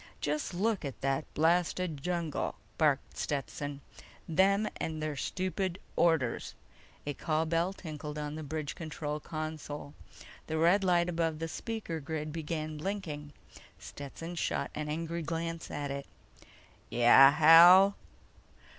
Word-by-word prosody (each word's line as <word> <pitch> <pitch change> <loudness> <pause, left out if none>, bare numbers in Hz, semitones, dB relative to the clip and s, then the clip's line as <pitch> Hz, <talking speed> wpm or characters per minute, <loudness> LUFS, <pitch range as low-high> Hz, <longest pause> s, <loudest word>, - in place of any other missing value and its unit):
"Just 150 +5 -2
look 210 +1 0
at 140 -3 -6
that 135 +2 -1
blasted 170 -1 +1
jungle!" 170 -6 -2 0.2
barked 145 -3 +1
Stetson. 145 0 -3 0.5
"Them 195 +5 +3
and 160 -1 -3
their 155 -1 -3
stupid 185 +4 -2 0.2
orders!" 160 -8 +1 0.5
A 145 - -2
call 155 +2 0
bell 165 +3 +1
tinkled 150 -5 -7
on 150 0 -4
the 155 - -5
bridge 155 0 -4
control 155 -2 -5
console. 155 -2 -6 0.5
The 160 - -2
red 175 +5 +4
light 175 -2 +3
above 165 -2 -1
the 165 +1 -3
speaker 210 -2 -4
grid 150 +1 -4
began 155 -1 -4
blinking. 155 -5 -4 0.5
Stetson 155 +4 -8
shot 170 - -2
an 150 0 -4
angry 165 +2 -3
glance 165 +1 -4
at 145 -1 -4
it. 140 0 -5 0.8
"Yeah, 120 +3 +8
Hal?" 175 +6 +8
160 Hz, 130 wpm, -31 LUFS, 150-170 Hz, 0.8 s, Yeah